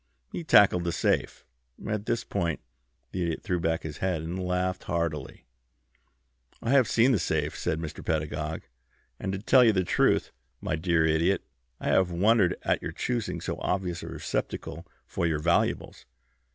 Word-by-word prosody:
He 175 - -4
tackled 100 - +5
the 85 - -1
safe." - - 0 0.4
At 105 0 -2
this 115 - 0
point 85 -5 -2 0.5
the 90 - -3
Idiot 85 -2 -2
threw 90 -3 -1
back 80 0 0
his 75 -2 -6
head 90 -4 -1
and 90 +3 -4
laughed 90 +1 -1
heartily. 85 -5 -3 1.1
"I 115 - -2
have 135 -4 +5
seen 120 +3 +4
the 115 - +3
safe," 75 -2 -1
said 80 - -2
Mr. 80 -2 -6
Pedagog, 75 0 -2 0.6
"and 95 - -3
to 95 - -2
tell 125 +6 +5
you 115 -2 +5
the 95 -2 +2
truth, - - +2 0.3
my - - -2
dear 80 0 +2
Idiot, 80 +5 +2 0.4
I - - -2
have 95 -1 +3
wondered 90 +1 +3
at - - +1
your - - -5
choosing 105 -9 -2
so - - -4
obvious 90 -2 -2
a - - -7
receptacle 85 +2 -4 0.2
for 85 - -1
your 80 -2 +1
valuables. 85 +3 0
90 Hz, 165 wpm, -28 LUFS, 80-95 Hz, 1.1 s, tackled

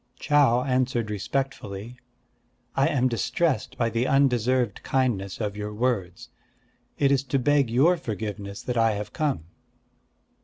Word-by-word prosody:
Chau 135 -4 +3
answered 125 -4 0
respectfully: 110 -1 -4 0.8
"I 135 - +3
am 130 -3 +2
distressed 135 +5 -1
by 115 -1 0
the 120 +3 0
undeserved 125 -4 +2
kindness 115 -8 -1
of 105 -2 -2
your 105 0 -5
words. 115 -2 -2 0.7
It 140 -1 +3
is 135 -1 +2
to 135 +1 0
beg 140 -1 +2
your 145 +10 +4
forgiveness 105 - -5
that 125 -1 -2
I 115 -1 +3
have 105 0 -5
come." 145 - -1
120 Hz, 130 wpm, -25 LUFS, 105-135 Hz, 0.8 s, your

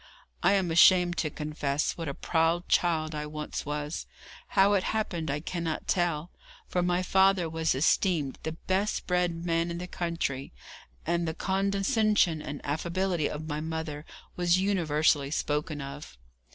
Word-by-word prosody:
I 195 - +4
am 190 -4 +1
ashamed 175 +1 +6
to 155 - 0
confess 150 -1 -2
what 165 -2 -5
a 140 - -5
proud 165 +1 +1
child 160 -3 +1
I 150 0 -4
once 150 0 -5
was. 150 +1 -4 0.4
How 195 +1 +4
it 200 - +3
happened 175 -8 -2
I 145 +2 -1
cannot 170 -1 -3
tell, 175 -2 0 0.4
for 180 - 0
my 180 +1 +1
father 190 -1 +3
was 160 -2 0
esteemed 150 0 +1
the 160 - -4
best 190 +5 -1
bred 175 -2 0
man 165 0 +1
in 170 - -4
the 180 - -5
country, 170 -7 -3 0.5
and 170 0 0
the 160 - -3
condescension 195 -2 +1
and 145 - -6
affability 170 +2 -1
of 155 +1 -6
my 150 -1 -2
mother 160 -2 -4 0.3
were 180 - -3
universally 165 -6 +2
spoken 150 0 -2
of. 140 - -8
165 Hz, 150 wpm, -28 LUFS, 150-180 Hz, 0.5 s, ashamed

